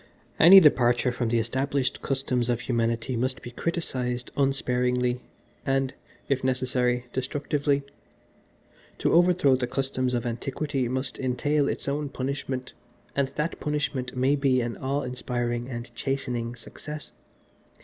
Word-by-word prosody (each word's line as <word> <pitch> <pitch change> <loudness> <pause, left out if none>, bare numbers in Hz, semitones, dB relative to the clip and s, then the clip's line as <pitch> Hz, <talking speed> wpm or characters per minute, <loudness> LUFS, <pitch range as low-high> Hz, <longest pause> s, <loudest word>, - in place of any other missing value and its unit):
Any 185 +4 +11
departure 125 -6 +4
from 120 -1 -1
the 120 - +2
established 130 +3 0
customs 125 -3 0
of 120 -1 +1
humanity 115 +1 0
must 130 +3 -2
be 120 - -7
criticised 125 -5 -3
unsparingly, 125 -2 +1 0.4
and, 135 -1 0 0.3
if 135 -2 0
necessary, 125 -1 +1
destructively. 140 +2 0 1.1
To - - +1
overthrow 175 -5 +5
the 125 -1 -1
customs 130 -1 -1
of 120 0 -2
antiquity 130 +3 -2
must 130 +3 -2
entail 140 +3 +1
its - - -4
own 145 +1 -1
punishment 130 -1 -4 0.4
and 140 -1 +2
that 150 +4 -3
punishment 145 -4 -2
may 130 +3 +3
be 135 -2 +2
an 120 -1 -2
awe 140 +2 -1
inspiring 120 -1 -2
and 120 -1 -6
chastening 120 -2 -2
Success. 150 +5 -9
130 Hz, 130 wpm, -26 LUFS, 125-140 Hz, 1.1 s, Any